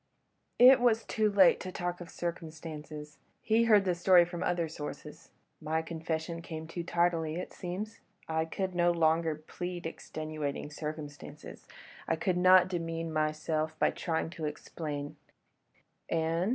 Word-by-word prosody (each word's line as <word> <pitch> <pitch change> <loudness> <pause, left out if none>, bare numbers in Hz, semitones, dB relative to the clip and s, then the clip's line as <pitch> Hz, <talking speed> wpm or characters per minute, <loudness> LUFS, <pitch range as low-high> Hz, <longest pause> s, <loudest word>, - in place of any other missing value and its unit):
"It 255 +2 +9
was 230 -2 +3
too 215 -1 +1
late 195 -3 +6
to 185 - -6
talk 175 0 -3
of 175 - -8
'circumstances'; 155 -3 -6 0.2
he 230 +1 +2
heard 210 -3 +5
the 180 - +2
story 175 0 +6
from 175 0 -6
other 175 -2 0
sources; 150 -1 -8 0.3
my 160 +1 -1
confession 165 0 -4
came 160 -1 -6
too 165 +2 -5
tardily, 170 -2 +1
it 180 - -6
seems. 205 +5 -5 0.3
I 160 0 0
could 185 +3 -3
no 175 0 +3
longer 165 -1 +2
plead 175 +3 -6
extenuating 155 -2 -5
circumstances: 150 -1 -8 0.4
I 165 - +2
could 180 +2 0
not 185 0 +7
bemean 165 -2 -3
myself 155 0 -1
by - - +3
trying 165 -2 -2
to 160 -3 -5
explain—" 150 -1 -5 0.9
"And?" 165 +3 +1
165 Hz, 140 wpm, -31 LUFS, 155-180 Hz, 0.9 s, It